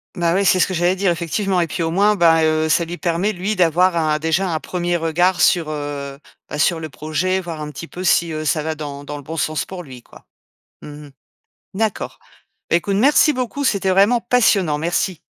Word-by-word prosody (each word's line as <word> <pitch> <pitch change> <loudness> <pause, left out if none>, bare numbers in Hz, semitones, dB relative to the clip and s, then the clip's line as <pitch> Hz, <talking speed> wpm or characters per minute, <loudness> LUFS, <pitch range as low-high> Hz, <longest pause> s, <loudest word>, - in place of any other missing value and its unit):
Bah 170 -2 +1
ouais, 195 +1 +1
c'est 185 0 +4
ce - - +4
que 185 - -4
j'allais 175 +2 +1
dire, 190 -2 +1
effectivement 180 +3 -1
et 170 - 0
puis, 165 +2 -3
au 165 - -1
moins, 205 +4 +3
bah, 165 -3 +4
heu, 155 0 +1
ça 170 +2 +2
lui 175 +1 -7
permet, 180 +4 -1
lui, 195 +4 -2
d'avoir 180 +1 +3
un 155 -2 +1
déjà 160 +4 0
un 160 - -1
1er 175 0 -2
regard 175 +3 +1
sur, 175 -4 +3
heu, 145 -2 -5 0.3
bah, 150 - -5
sur 165 +2 +2
le 160 -1 -6
projet, 155 +7 -2
voir 170 -4 -6
un 150 - -5
petit 155 +3 -8
peu 180 - -8
si, 170 -2 +2
heu, 155 0 -4
ça 155 -1 0
va 160 0 -2
dans 145 -2 -7
dans 145 +1 -7
le 145 - -9
bon 165 +3 -7
sens 155 0 -1
pour 185 -2 -8
lui, 130 -4 -12
quoi. - - -18 0.6
Mmh - - -9 0.2
mh. - - -15 0.6
D'accord, 220 +1 -2 0.5
écoute, 195 +3 +1
merci 290 +6 +4
beaucoup, 255 +3 -3
c'était 195 -6 +1
vraiment 200 +6 +4
passionnant, 195 -12 +2
merci. 170 +1 -1
170 Hz, 220 wpm, -19 LUFS, 155-190 Hz, 0.6 s, c'est